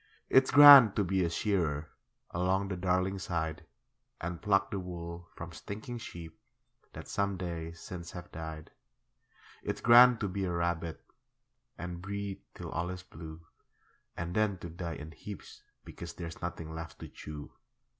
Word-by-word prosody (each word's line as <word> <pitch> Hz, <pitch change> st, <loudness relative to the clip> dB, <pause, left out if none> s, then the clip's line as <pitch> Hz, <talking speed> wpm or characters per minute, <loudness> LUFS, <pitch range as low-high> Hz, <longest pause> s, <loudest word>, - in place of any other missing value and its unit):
It's 130 Hz, 0 st, +5 dB
grand 140 Hz, -7 st, +10 dB
to 105 Hz, -, +2 dB
be 95 Hz, 0 st, +1 dB
a 85 Hz, -, +1 dB
shearer, 85 Hz, -5 st, -1 dB, 0.4 s
Along 95 Hz, +3 st, 0 dB
the 95 Hz, -, -2 dB
Darling 95 Hz, +1 st, 0 dB
side, 80 Hz, -3 st, -3 dB, 0.5 s
And 85 Hz, 0 st, -5 dB
pluck 100 Hz, -1 st, +2 dB
the 100 Hz, -, -2 dB
wool 85 Hz, -1 st, -7 dB
from 85 Hz, 0 st, -7 dB
stinking 110 Hz, +8 st, -7 dB
sheep 85 Hz, -7 st, -9 dB, 0.5 s
That -, -, -9 dB
some 100 Hz, -1 st, -1 dB
days 85 Hz, -2 st, -5 dB
since 85 Hz, -2 st, -7 dB
have 90 Hz, -1 st, -9 dB
died. 80 Hz, -1 st, -7 dB, 0.9 s
It's -, -, -3 dB
grand 120 Hz, 0 st, +8 dB
to 105 Hz, -, 0 dB
be 95 Hz, +1 st, -2 dB
a 90 Hz, -, -2 dB
rabbit 85 Hz, -2 st, -2 dB, 0.7 s
And 90 Hz, 0 st, -6 dB
breed 100 Hz, 0 st, -4 dB
till -, -, -7 dB
all 85 Hz, +2 st, -2 dB
is 90 Hz, 0 st, -6 dB
blue, 80 Hz, -2 st, -10 dB, 0.7 s
And 85 Hz, +1 st, -3 dB
then 105 Hz, -3 st, +2 dB
to 85 Hz, -1 st, -8 dB
die 85 Hz, -1 st, -5 dB
in 75 Hz, +2 st, -8 dB
heaps 100 Hz, +4 st, -10 dB, 0.2 s
because -, -, -8 dB
There's 85 Hz, -2 st, -7 dB
nothing 80 Hz, -2 st, -5 dB
left 80 Hz, 0 st, -7 dB
to -, -, -8 dB
chew. 75 Hz, -1 st, -9 dB
90 Hz, 155 wpm, -31 LUFS, 85-100 Hz, 0.9 s, grand